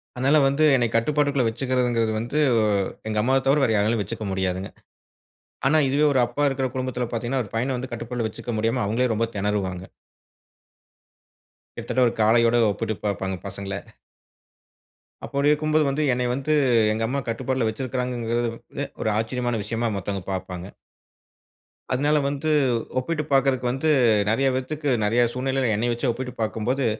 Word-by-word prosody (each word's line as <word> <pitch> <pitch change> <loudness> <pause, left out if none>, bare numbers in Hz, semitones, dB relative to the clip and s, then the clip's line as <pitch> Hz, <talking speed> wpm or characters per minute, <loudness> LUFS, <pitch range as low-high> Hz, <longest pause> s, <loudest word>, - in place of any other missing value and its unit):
அதனால் 135 +3 +3
வந்து 140 +3 +1
என்னை 120 -2 +2
கட்டுப்பாட்டுக்குள் 140 +2 +1
வைத்துக்கிறது 125 +2 0
என்கிறது 115 -2 +1
வந்து, 120 +6 -3 0.7
எங்க 110 -1 -2
அம்மாவை 130 +4 +2
தவிர 140 +2 +4
வேறு 110 -4 +2
யாராலும் 110 +2 +2
வைத்துக்கொள்ள 100 +1 -4
முடியாதுங்க. 95 0 -2 1.0
ஆனா 145 +3 +4
இதுவே 145 +3 +2
ஒரு 130 - +3
அப்பா 120 +5 -3
இருக்கிற 135 -1 -1
குடும்பத்தில் 130 -2 -3
பார்த்தீங்க 120 +1 -3
என்றால், 130 -2 0
ஒரு 105 - -16
பையனை 125 +4 0
வந்து 130 +1 -6
கட்டுக்குள் 120 +1 -4
வைத்துக்கொள்ள 115 +1 -5
முடியாமல், 115 +2 0
அவங்களே 115 +3 +1
ரொம்ப 115 +2 +1
தெனறுவாங்க. 100 -3 -2 1.9
கிட்டத்தட்ட 130 -1 +1
ஒரு 115 - -1
காளையோடு 115 +2 +4
ஒப்பிட்டு 110 +2 -3
பார்ப்பாங்க 95 -2 -2
பசங்க. 100 +1 -6 1.5
அப்படி 140 +1 +1
இருக்கும்போது, 155 +1 +2
வந்து 145 +3 0
என்னைய 125 0 0
வந்து 140 +4 -2 0.4
எங்க 110 +1 -1
அம்மா 140 +4 -1
கட்டுப்பாட்டுல 130 +1 -1
வச்சிருக்காங்குறது 120 -1 -2
வந்து, - - -6 0.2
ஒரு - - +1
ஆச்சரியமான 120 +1 -1
விஷயமா, 115 +2 -2
மத்தவங்க 100 0 -4
பாப்பாங்க. 90 0 -5 1.2
அதுனால 145 +4 +2
வந்து 145 +2 -2 0.5
ஒப்பிட்டு 155 +4 -2
பாக்குறதுக்கு 135 -2 +2
வந்து 135 +5 0 0.4
நெறைய 135 +5 +2
பேத்துக்கு, 145 +3 -2
நெறைய 115 +4 +2
சூழ்நிலையில 130 -1 0
என்னைய 120 +3 0
வச்சு 120 +2 -1
ஒப்பிட்டு 125 +1 -5
பாக்கும்போது, 120 +5 -1
120 Hz, 145 wpm, -24 LUFS, 110-135 Hz, 1.9 s, தவிர